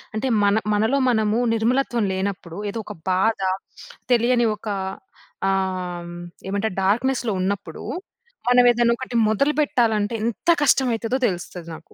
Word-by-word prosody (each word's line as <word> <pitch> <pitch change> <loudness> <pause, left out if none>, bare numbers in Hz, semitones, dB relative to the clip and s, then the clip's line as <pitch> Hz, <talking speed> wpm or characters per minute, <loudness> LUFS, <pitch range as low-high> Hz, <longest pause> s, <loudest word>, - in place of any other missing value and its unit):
అంటే 235 +5 -1 0.2
మన 200 0 +4 0.2
మనలో 220 +6 +2
మనము 220 -1 +2
నిర్మలత్వం 235 0 +1
లేనప్పుడు 190 -3 -4
ఏదో 225 - -4
ఒక - - -7 0.2
బాధ, 195 +4 +2 0.7
తెలియని 240 0 +3
ఒక 215 +1 -12 0.8
ఆహ్, 180 -2 -2 0.4
ఏమంటారు? 200 0 -1
డార్క్‌నెస్‌లో 235 +3 +1
ఉన్నప్పుడు 190 -3 -3 0.7
మనం 245 0 +6
ఏదన్నా 235 0 +3
ఒకటి 255 -1 -6
మొదలు 280 +8 +2
బెట్టాలంటే 225 -6 +1
ఎంత 235 +8 -2
కష్టం 270 -2 +4
అయితదో 225 +3 -1
తెలుస్తది 175 -2 -5
నాకు. 160 +1 -16
220 Hz, 125 wpm, -22 LUFS, 195-240 Hz, 0.8 s, మనం